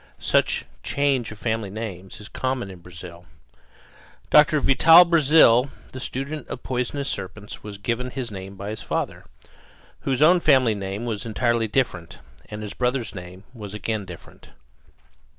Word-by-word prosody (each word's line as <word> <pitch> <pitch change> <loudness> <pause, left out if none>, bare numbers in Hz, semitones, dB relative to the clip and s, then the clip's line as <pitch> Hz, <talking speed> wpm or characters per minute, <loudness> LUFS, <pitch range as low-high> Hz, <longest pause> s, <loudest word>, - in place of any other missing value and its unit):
Such - - +1 0.2
change 140 -4 0
of 110 - -9
family 110 -2 -2
names 95 -3 -7
is 105 - -10
common 130 -6 -3
in 90 - -12
Brazil. 85 0 -12 1.0
Doctor 150 0 +6
Vital 165 +6 +7
Brazil, 150 -6 +5 0.2
the 130 - -7
student 140 +5 -5
of 125 - -7
poisonous 130 +2 -2
serpents, 105 -2 -6
was 105 -1 -8
given 120 +5 -2
his 125 -3 -5
name 95 0 -8
by 100 +2 -6
his 110 - -6
father, - - -3 0.8
whose 135 +1 0
own 175 +3 +6
family 130 -8 +4
name 100 +2 -5
was 110 -4 -3
entirely 115 0 0
different; 105 -8 -2 0.3
and 105 0 -6
his 105 -1 -6
brother's 125 -2 -1
name 90 +1 -10
was 105 -4 -8
again 110 0 -3
different. 90 -3 -13
115 Hz, 150 wpm, -23 LUFS, 100-135 Hz, 1.0 s, Vital